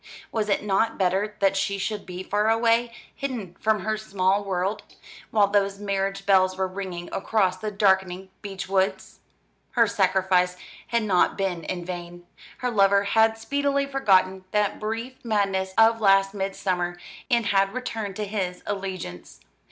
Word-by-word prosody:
Was 215 -2 -1
it 200 - +1
not 210 +3 +1
better 195 +3 0
that 195 0 +3
she 200 +1 0
should 210 +1 -4
be 180 0 -6
far 210 +3 +1
away, 230 +1 +2 0.2
hidden 240 -10 -5
from 215 -2 +1
her 215 +2 -1
small 200 -1 0
world; 195 +2 -2 0.5
while 210 -2 +4
those 200 -1 +1
marriage 195 -1 -2
bells 185 -1 +3
were 190 0 0
ringing 185 -2 -6
across 190 -3 +1
the 215 +3 -4
darkening 190 -2 +1
beech 195 -2 -6
woods? 190 0 -1 0.5
Her 235 -2 +5
sacrifice 190 -3 +2 0.3
had 235 -1 0
not 190 -4 +2
been 185 -4 -2
in 175 -2 -4
vain. 175 -1 -7 0.3
Her 250 -1 -2
lover 200 -2 +4
had 220 +2 +3
speedily 280 +4 0
forgotten 190 -9 +2
that 210 -1 0
brief 225 +4 -5
madness 195 -4 0
of 225 0 +5
last 195 -1 +4
midsummer, 185 -3 -2 0.3
and 235 -2 +2
had 195 -1 +2
returned 220 -6 -4
to 210 0 -3
his 190 -3 -3
allegiance. 190 - -6
195 Hz, 150 wpm, -25 LUFS, 190-215 Hz, 0.5 s, Her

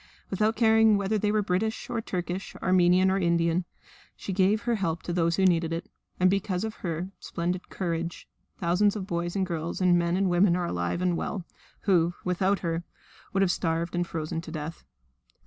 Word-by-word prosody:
Without 215 +3 +1
caring 220 -1 +5
whether 200 +2 0
they 210 +1 +1
were 215 -1 +2
British 200 +4 -1
or 225 - -2
Turkish, 180 -1 -4
Armenian 185 0 +4
or 195 - +1
Indian, 170 0 +1 0.5
she 195 - -5
gave 195 +4 +2
her 240 - +1
help 170 -6 -1
to 175 - -3
those 170 -1 +2
who 190 - +2
needed 165 -2 +3
it. 165 +1 -4 0.3
And 185 - +5
because 190 -1 0
of 220 -1 -4
her 175 +1 -4
splendid 175 +2 -3
courage 170 -2 -3 0.3
thousands 190 +4 +2
of 200 -3 -4
boys 175 0 -3
and 190 -1 +1
girls 170 -2 -3
and 180 -2 +4
men 170 +1 +1
and 195 0 +2
women 175 0 +4
are 180 -1 -1
alive 90 - -2
and 180 -1 +2
well, 180 +1 -3 0.4
who 175 -3 +2
without 185 +2 +1
her 165 -1 -2 0.5
would 195 - +1
have 185 - +3
starved 165 0 -1
and 175 0 0
frozen 160 0 -3
to 165 - -9
death. 155 +1 -6
180 Hz, 190 wpm, -27 LUFS, 170-195 Hz, 0.5 s, caring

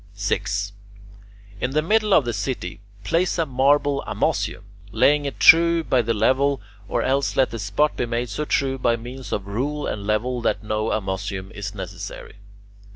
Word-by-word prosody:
6. 100 0 -2 0.9
In 125 - -1
the 155 +1 +2
middle 215 +4 +2
of 150 - +5
the 120 - -2
city 105 -8 -4 0.2
place 170 - +1
a 165 - +1
marble 140 +1 +2
amussium, - - -1 0.3
laying 145 +5 +3
it 140 - -5
true 170 0 +6
by 130 -5 +2
the 115 0 -1
level, 135 +5 +2 0.3
or - - 0
else 135 +1 0
let 130 -4 +2
the 115 - -5
spot 105 +9 +1
be 120 - -1
made 120 +1 -2
so 105 +9 -3
true 135 -2 0
by 120 -2 +2
means 125 +2 -8
of 100 - -2
rule 140 +9 -2
and 100 -1 -4
level 120 +4 0
that 115 - 0
no 110 0 -1
amussium 95 -1 -3
is 105 0 -6
necessary. 95 0 -8
125 Hz, 170 wpm, -23 LUFS, 105-145 Hz, 0.9 s, true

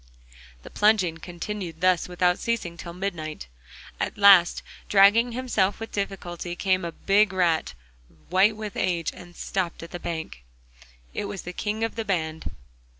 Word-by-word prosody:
The - - -11
plunging 195 -6 +2
continued 175 0 -6
thus 185 -1 +3
without 180 0 +1
ceasing 230 -8 -2
till 170 0 -8
midnight. 170 - -4 0.5
At - - -2
last, 195 -4 +6 0.3
dragging 210 +4 +5
himself 230 -6 0
with 225 - -7
difficulty, 180 -3 -4
came 185 0 +1
a 170 - -3
big 200 +3 +2
rat, 175 -4 +1 0.6
white 195 +4 +4
with 215 -2 -6
age, 170 -3 0
and 175 -1 -13
stopped 180 -3 -3
on 165 - -9
the 175 - -6
bank. 160 - -5 0.7
It - - -3
was 200 -2 -6
the 180 - -7
king 215 +3 -2
of 225 - -1
the 225 - -3
band. 160 -5 -2
185 Hz, 150 wpm, -25 LUFS, 175-205 Hz, 0.7 s, last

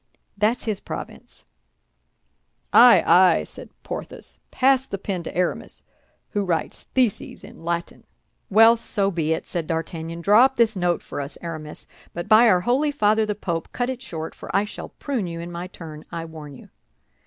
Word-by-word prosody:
That's 215 +4 +1
his 215 -3 -2
province." - - -9 1.3
"Ay, - - +8
ay!" 180 -2 +5
said - - -11
Porthos; - - -6
"pass 265 0 +3
the 200 - -6
pen 190 -2 -4
to 170 - -7
Aramis, 180 - -2 0.5
who 205 - 0
writes 170 -4 -2
theses 245 -7 0
in 205 -3 -13
Latin." 170 0 -4 0.4
"Well, 225 +3 +6
so 200 -3 -1
be 160 -3 -1
it," 160 - -4
said 170 -3 -4
D'Artagnan. 165 0 -4
"Draw 210 +7 +6
up 265 - 0
this 230 -3 +2
note 175 -2 0
for - - -5
us, 140 +1 -7
Aramis; 155 -3 -7 0.3
but 175 - -5
by 225 +2 +7
our 180 -3 +4
Holy 255 +9 +1
Father 215 -6 +2
the 210 - -1
Pope, 170 -5 -4
cut 245 +1 -1
it 255 -1 -7
short, 160 -8 -6
for - - -11
I 195 - +4
shall 210 - -8
prune 255 -10 -3
you 165 -1 -6
in 170 +1 -7
my 175 +1 -5
turn, 155 -4 -10
I 165 -1 -5
warn 155 -3 -10
you." - - -15
185 Hz, 175 wpm, -23 LUFS, 165-225 Hz, 1.3 s, Ay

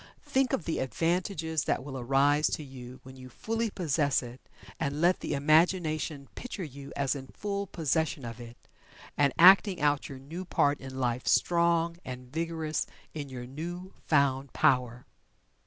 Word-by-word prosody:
Think 265 -2 +1
of 170 - -1
the 165 - -1
advantages 165 +2 -1
that - - 0
will 135 -1 -7
arise 140 +4 +3
to 155 - -8
you 130 -2 -10
when 130 0 -12
you 130 0 -11
fully 225 - -2
possess 150 -8 0
it, 120 +1 -10 0.4
and 145 -1 -2
let 175 +3 +3
the - - -2
imagination 155 -1 +2
picture 235 -6 -6
you 140 -2 -9
as 140 -1 +1
in 135 -2 -7
full 200 +3 -4
possession 160 -4 -1
of 115 0 -7
it, 120 0 -10 0.6
and 140 -1 +3
acting 190 +1 +7
out 145 -1 +1
your 135 - -7
new 155 +8 -7
part 145 -5 +1
in 130 -1 -8
life 125 -1 -1
strong 170 -1 +2
and 125 0 -8
vigorous 160 -1 -2 0.3
in 145 -3 -5
your 125 -2 -7
new 175 +8 -7
found 140 -3 +2
power. 125 -1 +2
145 Hz, 160 wpm, -29 LUFS, 130-170 Hz, 0.6 s, acting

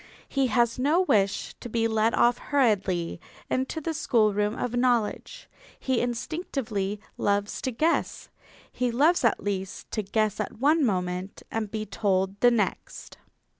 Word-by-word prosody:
He 275 -1 +1
has 235 +1 +1
no 300 +7 +3
wish 205 - +1
to 240 - -8
be 230 0 +1
led 220 0 +1
off 240 0 +3
hurriedly 195 - 0 0.3
into 265 +5 -1
the 320 +1 -3
schoolroom 215 -7 +1
of 245 -1 -2
knowledge. 245 - 0 0.3
He 260 -3 0
instinctively 235 - -3 0.2
loves 205 0 0
to 260 - -2
guess. 315 +8 0 0.4
He 250 -1 -1
loves 295 +9 +3
at 230 - +2
least 195 -2 -4
to 215 - -1
guess 215 +1 0
at - - -4
one 295 +6 +3
moment 180 -3 -2
and 225 -1 -2
to - - -24
be 215 - -3
told 195 -1 0
the 245 - +6
next. 225 -5 -3
230 Hz, 150 wpm, -26 LUFS, 205-260 Hz, 0.4 s, the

